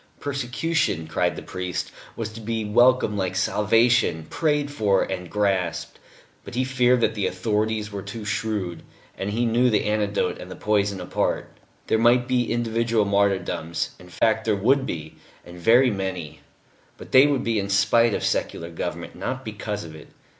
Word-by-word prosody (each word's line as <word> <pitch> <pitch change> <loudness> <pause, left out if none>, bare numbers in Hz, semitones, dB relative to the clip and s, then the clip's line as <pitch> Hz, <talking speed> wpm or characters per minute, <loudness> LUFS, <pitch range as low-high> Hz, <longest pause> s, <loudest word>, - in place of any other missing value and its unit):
Persecution, 140 - -1
cried 85 +2 0
the - - -7
priest, 90 -1 -4 0.2
was 115 -2 -4
to 110 +1 -10
be 110 0 -2
welcomed 120 -1 +3
like 95 -1 -1
salvation, 105 -3 +2
prayed 150 -2 0
for, 105 -8 +2
and 90 -2 -5
grasped; 95 -5 -1 0.4
but - - -9
he 130 - +1
feared 125 -1 +2
that - - +2
the 100 -3 -1
authorities 105 +3 -1
were 100 -1 -5
too 110 +3 -7
shrewd, 105 -6 -2 0.3
and 100 +1 -3
knew 120 +2 +2
the 110 - +2
antidote 105 -3 0
and 90 - -9
the 90 - -7
poison 100 -2 0
apart. 90 - -2 0.3
There 110 - +1
might 120 +1 +4
be 125 -2 +1
individual 115 -2 +1
martyrdoms 95 -4 0
in 90 - -14
fact 110 +4 +1
there 110 -2 +2
would 130 +7 +2
be, 80 -2 -6 0.3
and 90 0 -11
very 120 +7 +5
many 90 -6 -4 0.6
but - - -12
they 130 +2 +7
would 140 -3 0
be 115 -2 0
in 100 0 -3
spite 105 +3 +3
of - - -3
secular 85 +1 -2
government, 85 - -5
not 130 0 -4
because 105 -2 -4
of 80 -2 -10
it. 75 - -12
105 Hz, 170 wpm, -24 LUFS, 95-120 Hz, 0.6 s, they